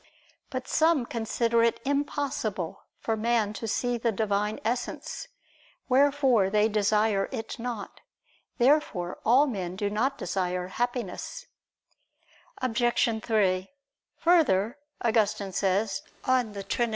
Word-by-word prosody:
But 255 -2 -5
some 320 -5 +3
consider 230 0 0
it 230 0 +2
impossible 275 - -2
for 225 - -1
man 220 -1 +1
to 225 - -5
see 240 +2 0
the 230 0 +1
Divine 210 0 -1
Essence; 240 - -3 0.6
wherefore 265 -6 +4
they 210 +1 +3
desire 210 -1 +2
it 225 -4 -5
not. 230 -3 -5 0.6
Therefore 240 - +2
all 255 +6 +5
men 185 -9 -3
do 205 +1 -2
not 260 +7 0
desire 180 -4 -2
Happiness. 245 - -3 1.2
Obj. 240 -2 +1
3: 195 -4 +1 0.5
Further, 280 - +3 0.2
Augustine 215 -4 +1
says 195 +2 0 0.2
(De 240 -7 +1
Trin. 235 +4 0
225 Hz, 110 wpm, -27 LUFS, 205-250 Hz, 1.2 s, all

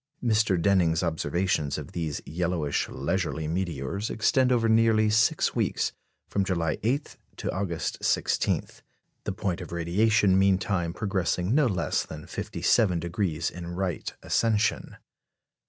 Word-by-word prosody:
Mr. 110 -5 +2
Denning's 85 -2 +2
observations 80 -2 0
of - - -7
these 80 -4 -3
yellowish, 85 -2 -1
leisurely 80 +2 -2
meteors 85 +2 -2
extend 130 +4 +2
over 115 -2 +3
nearly 110 -1 +4
six 110 0 +3
weeks, - - 0 0.4
from 100 - 0
July 85 -4 -1
8 130 +7 -1 0.2
to - - -3
August 90 -4 -3
16; - - +1 0.6
the - - -1
point 90 -4 -2
of - - -8
radiation 95 +3 +3
meantime 95 -3 +1
progressing 95 0 -1
no 145 -1 +4
less 90 -6 0
than 75 -1 -9
57° 85 -5 0
in 90 -1 -8
right 90 -3 -2
ascension. 110 -2 0
95 Hz, 120 wpm, -27 LUFS, 85-105 Hz, 0.6 s, nearly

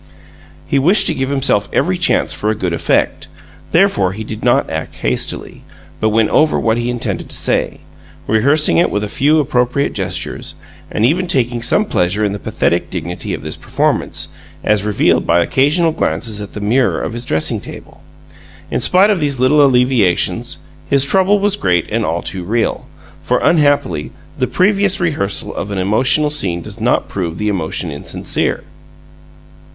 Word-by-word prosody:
He 140 - +1
wished 190 +8 +4
to - - +2
give 130 0 -2
himself 135 -7 +1
every 185 +2 +1
chance 175 -1 +1
for 105 - -2
a 110 - 0
good 90 -5 -2
effect; 85 - 0 0.4
therefore, 165 - +3
he 110 +3 -6
did 110 0 -7
not - - +3
act - - -5
hastily, 60 +1 -3 0.4
but 110 - +2
went 110 0 +2
over 155 0 +3
what 115 0 +1
he 120 +1 -2
intended 120 -1 -3
to - - -3
say, - - -1 0.4
rehearsing 140 +8 +3
it 170 - +3
with 105 - -2
a - - -2
few 145 +8 +2
appropriate 130 0 0
gestures, - - -4 0.4
and 110 - +1
even 180 +8 +1
taking 120 -5 +1
some 205 - +2
pleasure 100 - 0
in 100 - -1
the 100 - -5
pathetic - - -1
dignity - - -5
of - - -10
this 75 +1 -5
performance, - - -1 0.3
as 105 -2 +2
revealed 105 -1 +1
by 85 - +4
occasional 150 - +2
glances 105 - -2
at 100 - -8
the - - -4
mirror 120 +5 +1
of - - -4
his 120 0 -4
dressing 80 -9 -1
table. - - -11 0.7
In - - 0
spite 190 +4 +4
of 200 - +1
these 145 -4 -1
little 145 +4 +4
alleviations, 125 -8 +2 0.3
his 140 -1 +3
trouble 190 +6 +3
was 205 0 +1
great 90 - 0
and 115 +1 0
all 85 -2 -2
too 95 -2 -3
real, 115 +5 -1 0.3
for, - - +1
unhappily, 145 - +2 0.3
the - - +1
previous 195 0 +1
rehearsal 145 - -2
of 100 - -5
an 100 - -4
emotional 125 +10 +2
scene 90 - -2
does 105 +1 -9
not 120 - +1
prove 85 -4 -4
the 105 0 -1
emotion 85 -3 -3
insincere. 70 - -3
120 Hz, 170 wpm, -16 LUFS, 100-150 Hz, 0.7 s, wished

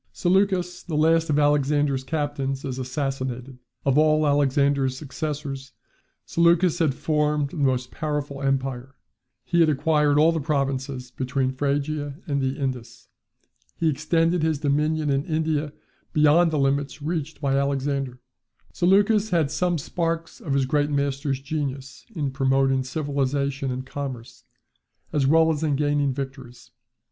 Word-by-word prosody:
Seleucus, 185 -1 +1
the 165 - -5
last 165 +1 +3
of 150 - +2
Alexander's 145 -2 +2
captains, 140 -2 -2
is 130 -1 -4
assassinated. 130 -1 -4 0.3
Of 135 +1 +3
all 155 0 +4
Alexander's 140 -2 +2
successors, 140 -1 -5 0.5
Seleucus 170 +1 +3
had 155 -6 +2
formed 150 -2 0
the - - -8
most 130 -3 0
powerful 145 -3 -3
empire. 135 -1 -2 0.5
He 170 +7 0
had 165 -2 +5
acquired 150 0 +2
all 155 +2 +5
the 165 - -1
provinces 135 -3 -2
between 130 +1 -1
Phrygia 145 +1 -2
and 140 -4 -1
the 130 0 -1
Indus. 130 -4 -5 0.7
He 165 - +1
extended 165 +4 +1
his 160 -1 +1
dominion 150 +1 0
in 135 0 +1
India 155 -2 -1 0.4
beyond 155 +3 +5
the 155 - -1
limits 140 +1 0
reached 160 -1 -3
by 140 -2 0
Alexander. 140 -2 -1 0.5
Seleucus 205 +4 +3
had 160 -5 +1
some 175 +2 0
sparks 165 +2 -3
of 140 - -3
his 135 -1 +2
great 145 +2 +1
master's 140 -1 -1
genius 140 -2 -5
in 145 -5 -1
promoting 135 0 +2
civilization 140 -1 -1
and 130 0 -4
commerce, 130 -4 -7 0.7
as 140 -3 +2
well 160 +2 +5
as 150 -1 -2
in 150 -3 +1
gaining 145 -1 +1
victories. 135 -2 -7
145 Hz, 135 wpm, -24 LUFS, 135-155 Hz, 0.7 s, had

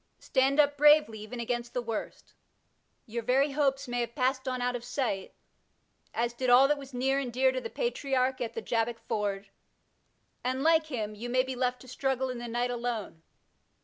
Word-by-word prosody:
Stand 270 +2 +1
up 290 -1 +4
bravely, 295 -6 +5
even 215 +3 -7
against 240 0 -3
the - - +1
worst. 225 -2 -5 0.7
Your 235 +1 -4
very 270 +5 +2
hopes 275 -1 +1
may 245 0 -2
have 235 -1 -3
passed 260 0 0
on 255 -1 -1
out 245 0 0
of 240 - -5
sight, 240 -6 -3 0.8
as 235 +1 -1
did 255 +1 -1
all 255 +3 +7
that 295 0 +1
was 275 -1 -10
near 265 +2 +1
and 255 -3 -3
dear 260 +2 +3
to 260 0 -3
the - - -5
Patriarch 265 - -1
at 235 - -3
the 455 - -4
Jabbok 230 0 0
ford, 200 -2 -2 0.9
and, 260 +2 -1
like 320 0 +4
him, 220 -7 -3
you 230 +3 -6
may 255 +1 +3
be 260 0 -5
left 250 0 -1
to 255 - -13
struggle 265 0 -1
in 250 - -6
the 240 - -5
night 240 +1 -1
alone. 235 -8 -4
250 Hz, 195 wpm, -29 LUFS, 235-270 Hz, 0.9 s, all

